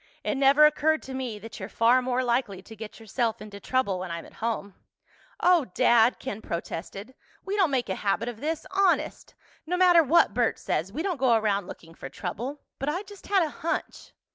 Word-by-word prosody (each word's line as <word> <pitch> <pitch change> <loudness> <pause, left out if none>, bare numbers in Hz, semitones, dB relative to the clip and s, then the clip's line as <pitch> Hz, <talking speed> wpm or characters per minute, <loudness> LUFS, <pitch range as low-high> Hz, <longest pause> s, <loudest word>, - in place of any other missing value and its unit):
It - - 0
never 275 +2 +6
occurred 305 +1 +2
to 265 - -8
me 255 -5 -4
that 225 +3 -10
you're 190 +1 -6
far 235 +4 +4
more 255 0 0
likely 235 -6 -1
to 220 - -12
get 220 +1 -9
yourself 225 +1 -2
into 205 -1 -10
trouble 205 -6 0
when 185 0 -5
I'm 170 0 -5
at - - -16
home." 220 -3 -2 0.7
"Oh, 350 -5 +4
Dad!" 235 +1 +4
Ken 220 -5 -6
protested. 195 +7 -6 0.3
"We 390 - -2
don't 380 -6 +3
make 260 -4 0
a 190 - -1
habit 210 +4 -1
of 235 -2 -6
this—honest! 370 +5 -1 0.3
No 360 +2 0
matter 355 -2 +6
what 315 -7 +4
Bert 240 0 +1
says, 170 +5 -2
we 310 +10 -3
don't 370 -4 -1
go 250 -3 +4
around 205 -4 0
looking 165 -1 -11
for 135 - -9
trouble. 245 - -5 0.2
But 270 - -1
I 355 +6 -2
just 405 -1 -14
had 390 -3 +3
a 315 - -2
hunch...." 330 - -4
245 Hz, 200 wpm, -26 LUFS, 210-305 Hz, 0.7 s, never